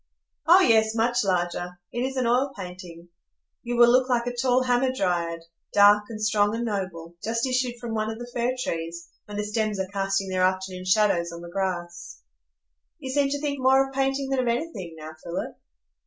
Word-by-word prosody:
"Oh 360 +3 +8
yes, 220 -6 +4
much 240 +1 +2
larger. 175 -1 -2
It 240 - -4
is 265 +1 -2
an 255 - +1
oil 255 +4 +2
painting. 180 -2 -9 0.5
You 240 0 -3
will 240 0 +7
look 255 +1 +3
like 240 -1 +1
a 245 0 -3
tall 255 +1 +2
Hamadryad, 195 -10 0 0.3
dark 205 +1 +6
and 220 -2 -6
strong 210 0 +2
and 235 +1 -2
noble, 180 -5 -4
just 230 +2 -1
issued 255 -1 0
from 240 -2 -5
one 215 0 -1
of 220 - -5
the 240 +1 -8
fir 245 +2 0
trees, 165 +1 -5 0.2
when 205 0 -7
the 210 - -1
stems 210 -1 -1
are 190 - 0
casting 195 0 -1
their 185 -1 -1
afternoon 185 0 -1
shadows 185 -3 +2
on 170 0 -8
the 170 0 -10
grass." 175 - -4 0.8
"You 260 - -6
seem 280 0 +2
to 285 +1 -2
think 285 -1 -2
more 265 +1 +4
of 270 - -13
painting 270 0 0
than 270 - +1
of 250 - 0
anything 235 - -3
now, 155 0 -8
Philip?" 170 - -5
215 Hz, 195 wpm, -25 LUFS, 185-250 Hz, 0.8 s, Oh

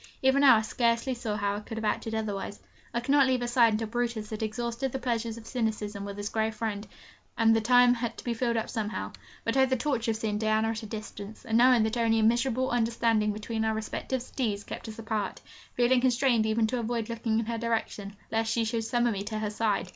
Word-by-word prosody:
Even 265 +1 +4
now 275 -4 +8
I 220 - +2
scarcely 235 +3 +1
see 240 -2 -5
how 205 -1 -1
I - - -3
could 225 +1 -8
have 220 - -3
acted 220 +1 -1
otherwise: 205 -2 -3 0.3
I 235 - -1
could 245 - -2
not 280 -2 +5
leave 255 -1 +1
her - - -1
side 240 -2 +4
until 220 +1 -1
Brutus 235 -2 -2
had 215 - -4
exhausted 235 +4 -2
the 265 - -2
pleasures 235 -3 -2
of 225 - -11
cynicism 215 -4 -2
with 200 0 -6
his 205 0 -3
grey 220 0 0
friend, 215 -1 -4 0.5
and 225 -1 +5
the 225 - +2
time 245 +2 +6
had 235 -1 -3
to - - -8
be 240 - -1
filled 235 -1 0
up 225 - -1
somehow. 210 - -3 0.3
But, 230 - -1
oh, 265 0 +5
the 260 0 +1
torture 245 -4 -1
of 220 - 0
seeing 215 -2 -2
Diana 220 0 +2
at 225 0 -3
a 220 - -7
distance, 210 -1 -8
and 225 - -1
knowing 250 -2 +6
that 220 +2 -1
only 225 -1 +2
a 220 - +2
miserable 240 +3 +2
misunderstanding 230 -2 +2
between 220 +2 -3
our 220 0 +1
respective 240 +3 -3
steeds 215 -6 -2
kept - - -7
us 220 - -9
apart, 220 -3 -3 0.4
feeling 245 +1 +3
constrained 245 -3 +3
even 220 +1 +2
to 245 +3 -1
avoid 230 -1 -2
looking 230 -1 -1
in 230 - -2
her 230 0 -3
direction, 220 -3 -2 0.2
lest 225 0 0
she 230 -1 +1
should 225 0 -1
summon 240 +1 +1
me 195 - -3
to 215 - -3
her 215 -1 -2
side! 210 -3 0
225 Hz, 240 wpm, -28 LUFS, 215-240 Hz, 0.5 s, now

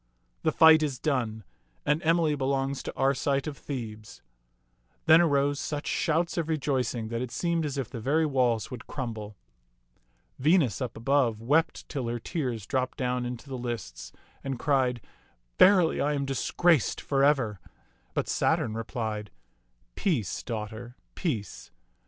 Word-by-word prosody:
The 155 - +2
fight 160 -1 +7
is 145 -4 -1
done, 120 -8 -1 0.4
and 150 +2 +2
Emily 165 -1 +3
belongs 135 -1 -1
to - - -6
Arcite 135 +1 +1
of 155 -2 -4
Thebes." 110 -7 -7 0.8
Then 160 +1 +7
arose 145 -3 +2
such 150 0 -4
shouts 170 +1 0
of 165 -1 -2
rejoicing 130 -7 -1
that 115 0 -2
it 125 - -3
seemed 170 +2 -1
as 140 -1 -5
if 135 -4 -2
the 120 - -7
very 150 +8 +2
walls 125 -6 +1
would 125 -3 -8
crumble. 110 -6 -5 1.0
Venus, 145 - +3
up 125 -3 -4
above, 120 -2 +2
wept 145 +8 +1
till 135 -5 -3
her 120 +1 -2
tears 120 - -3
dropped 130 0 -1
down 125 -1 -1
into 125 +3 -7
the 130 -2 -5
lists, 120 - -5 0.3
and 135 -2 -3
cried, 130 -3 +1 0.3
" - - -43
Verily, 185 -4 +6
I 150 +1 +1
am 140 -1 -1
disgraced 140 - +2
for 135 -1 0
ever"; 130 -9 +2 0.6
but - - 0
Saturn 110 - +1
replied, 110 -2 -4 0.6
"Peace, 135 - -1
daughter, 115 +1 -6 0.2
peace. 120 - -4
135 Hz, 145 wpm, -28 LUFS, 115-150 Hz, 1.0 s, fight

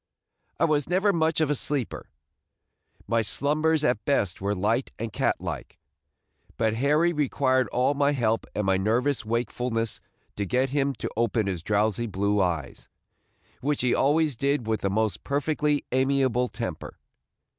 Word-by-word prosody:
I - - +4
was 150 -2 +1
never 195 +3 +3
much 160 -2 +1
of 150 -2 +2
a - - +4
sleeper; 140 -3 -2 1.0
my 115 0 +2
slumbers 150 - +1
at 120 -6 +1
best 100 -12 0
were 100 +1 0
light 110 +7 0
and 110 -1 -5
cat - - +1
like; - - -6 0.8
but 110 -1 +1
Harry 150 +8 +2
required 130 -3 +1
all 125 +3 +1
my 145 0 +2
help 115 -4 0
and 105 - -1
my 95 -1 +3
nervous 120 +8 +1
wakefulness 115 0 -2 0.4
to 100 - -1
get 130 +6 0
him 140 -1 0
to - - -4
open 115 -1 +1
his 95 -4 -2
drowsy 105 +4 0
blue 100 0 0
eyes, 85 -7 -2 0.7
which 145 +2 -1
he 125 -1 +2
always 150 +1 +2
did 140 0 0
with 110 -2 -1
the 100 - 0
most 110 +1 -1
perfectly 145 +1 0
amiable 130 -1 +2
temper. 115 -10 -6
125 Hz, 155 wpm, -26 LUFS, 110-145 Hz, 1.0 s, I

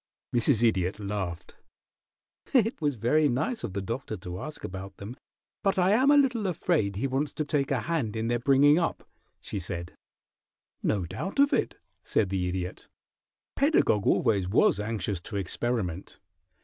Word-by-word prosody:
Mrs. 120 0 +3
Idiot 95 -2 0
laughed. 100 -4 -5 1.0
"It 225 -5 +3
was 145 -3 +1
very 145 +7 +2
nice 155 - -1
of 95 - -4
the 100 0 -3
Doctor 115 +1 -4
to 90 +1 -7
ask 155 0 -8
about 95 +1 -7
them, 105 +5 -8 0.5
but 195 -2 +1
I 185 +1 +3
am 255 +6 +4
a 290 - +7
little 250 -7 +2
afraid 155 - 0
he 105 - -2
wants 135 +2 -1
to 155 - -2
take 145 -2 0
a 130 -4 0
hand 130 -7 -2
in 110 0 -1
their 120 0 +1
bringing 140 +5 +5
up," 170 - -2 0.3
she 100 - -5
said. 85 -1 -5 0.9
"No 100 -4 0
doubt 145 - -5
of 280 +1 +4
it," 255 - 0 0.3
said 100 - +1
the 95 -2 -1
Idiot. 90 0 -5 0.7
"Pedagog 275 - +3
always 100 -4 +2
was 100 0 +3
anxious 105 -3 -2
to 105 - -8
experiment. 95 -2 -3
115 Hz, 160 wpm, -28 LUFS, 95-155 Hz, 1.0 s, a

